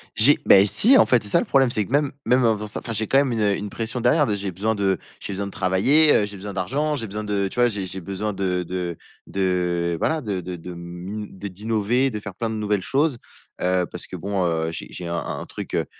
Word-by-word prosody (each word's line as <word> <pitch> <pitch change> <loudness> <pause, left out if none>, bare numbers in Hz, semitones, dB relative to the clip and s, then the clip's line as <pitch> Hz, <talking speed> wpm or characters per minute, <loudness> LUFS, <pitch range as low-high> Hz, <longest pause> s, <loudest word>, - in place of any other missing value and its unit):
J'ai, 135 +7 +6
bah - - +8
et 100 +2 +5
si, 255 - +6
en - - +6
fait 120 -4 +3
c'est 105 - -2
ça - - +4
le - - -2
problème, 135 -3 +3
c'est 105 -3 0
que - - -13
même 145 0 +2
même, 125 0 +3
heu, 115 - +4
enfin 105 -1 -1
ça 105 - -4
enfin 115 - -6
j'ai 110 -1 -2
quand 135 - +3
même 140 -2 +3
une, 115 - -1
heu, 100 -2 +2
une 105 - -5
pression 115 +4 -4
derrière, 145 +6 +4
de 105 - 0
j'ai 100 -1 -4
besoin 105 +5 -1
de 95 -2 +1 0.2
j'ai - - -5
besoin 100 +1 -3
de - - -8
travailler, 115 +14 +4
heu, 105 - +3
j'ai 105 0 -8
besoin 100 +1 -7
d'argent, 145 +11 -1
j'ai 115 -4 -4
besoin 105 +2 -5
de, 100 -2 -1
tu - - -9
vois? 120 0 +4
J'ai 100 -4 -4
j'ai 95 +1 -6
besoin 100 +4 -4
de 90 -2 -1
de 90 -1 -4 0.3
de, 90 -3 0
voilà, 160 0 +1
de 105 -9 -3
de 90 0 -6
de 90 +2 -8
m'i 90 +5 -7
de 100 +2 -7
d'innover, 110 +6 0
de 105 - -5
faire 100 -2 -8
plein 115 +2 -2
de 110 - -3
nouvelles 105 -2 0
choses, 140 - 0 0.4
heu, 90 0 +2
parce - - -7
que - - -8
bon, 100 -2 -2
heu 80 -1 0
j'ai - - -6
j'ai 90 - -7
un 85 - -2
un - - -5
truc, - - -6
heu, - - 0
105 Hz, 275 wpm, -23 LUFS, 95-115 Hz, 0.4 s, bah